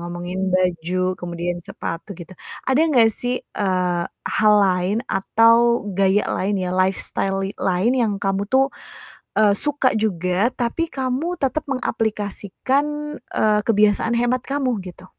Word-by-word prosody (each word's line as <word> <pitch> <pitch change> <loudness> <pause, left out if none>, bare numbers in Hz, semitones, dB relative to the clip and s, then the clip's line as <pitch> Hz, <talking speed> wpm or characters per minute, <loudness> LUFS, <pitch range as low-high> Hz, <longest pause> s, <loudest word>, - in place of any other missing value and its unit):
ngomongin 175 +2 -4
baju, 185 0 0
kemudian 175 0 -4
sepatu 165 +5 -6
gitu, 175 +1 -11 0.3
ada 265 +3 +2
gak 230 -5 +5
sih, 245 +3 -1
eee, 180 -3 -1 0.2
hal 215 -1 +3
lain 190 +2 +1
atau 230 +3 +3
gaya 195 +1 +2
lain 200 +2 -1
ya, 180 0 -2
lifestyle 195 +1 +1
li 195 - -4
lain 190 +6 +1
yang 225 -4 +1
kamu 195 0 -1
tuh, 270 +1 +4 0.7
eee, 210 -2 +5
suka 290 -3 +2
juga, 190 +1 0
tapi 250 +7 -2
kamu 270 +7 -2
tetap 275 +2 -1
mengaplikasikan, 225 +2 -1 0.4
eee, 210 -1 +1
kebiasaan 210 +1 +2
hemat 245 +1 +1
kamu, 260 -7 -1
gitu? 185 0 -11
205 Hz, 130 wpm, -21 LUFS, 185-240 Hz, 0.7 s, gak